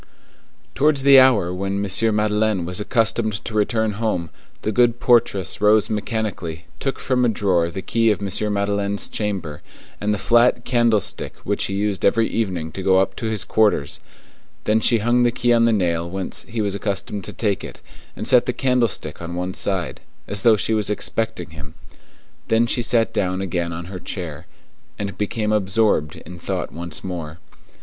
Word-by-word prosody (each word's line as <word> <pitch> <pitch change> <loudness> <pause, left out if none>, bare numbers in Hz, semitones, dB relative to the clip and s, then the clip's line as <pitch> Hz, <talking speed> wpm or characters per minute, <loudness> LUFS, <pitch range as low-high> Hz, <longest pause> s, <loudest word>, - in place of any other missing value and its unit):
Towards 145 -1 +3
the 140 -1 +8
hour 110 -9 +4
when 95 +1 -3
M. 110 +3 +1
Madeleine 105 -3 +1
was 90 +3 -1
accustomed 110 +1 +1
to 115 - -6
return 110 +1 +1
home, 105 -6 -2 0.3
the 110 - 0
good 120 +2 +3
portress 115 -8 +2
rose 105 0 +4
mechanically, 105 -6 -3
took 135 - -2
from 125 -1 0
a 120 - +3
drawer 95 -6 +1
the 95 +2 -6
key 115 +2 +2
of 105 - +1
M. 100 +1 -1
Madeleine's 100 0 0
chamber, 95 -9 -4 0.4
and 105 +1 0
the 105 - 0
flat 120 +3 +3
candlestick 120 -5 +1
which - - 0
he 95 - -3
used 100 -1 -2
every 115 +3 +3
evening 90 -8 -2
to 95 - -6
go 95 0 +3
up 95 - +1
to 115 - -3
his 110 -2 0
quarters; 105 -10 +1 0.6
then 110 +1 +2
she 115 +1 +3
hung 120 +3 +2
the 120 - +4
key 120 0 +1
on 115 0 +4
the 115 - +3
nail 85 -5 0
whence 95 +1 -4
he 115 -1 -2
was 100 -2 -1
accustomed 100 0 -3
to - - -4
take 105 -4 -1
it, - - -9 0.4
and - - -3
set - - +5
the - - 0
candlestick 120 - 0
on 85 +1 -6
one 90 +1 -3
side, 95 -3 -2 0.3
as 100 -1 -1
though 110 -1 +5
she 110 - -1
was 105 -2 +1
expecting 105 -4 -2
him. 75 0 -11 0.7
Then 115 +1 +3
she 120 +1 0
sat 115 -1 +2
down 95 -1 -1
again 90 -3 -2
on 85 +1 -6
her 90 +1 -7
chair, 85 -6 -6 0.5
and 100 -1 -4
became 105 +1 -2
absorbed 100 -6 +1
in 90 +2 -11
thought - - -3
once 85 -2 -5
more. 85 -4 -6
105 Hz, 180 wpm, -21 LUFS, 90-115 Hz, 0.7 s, the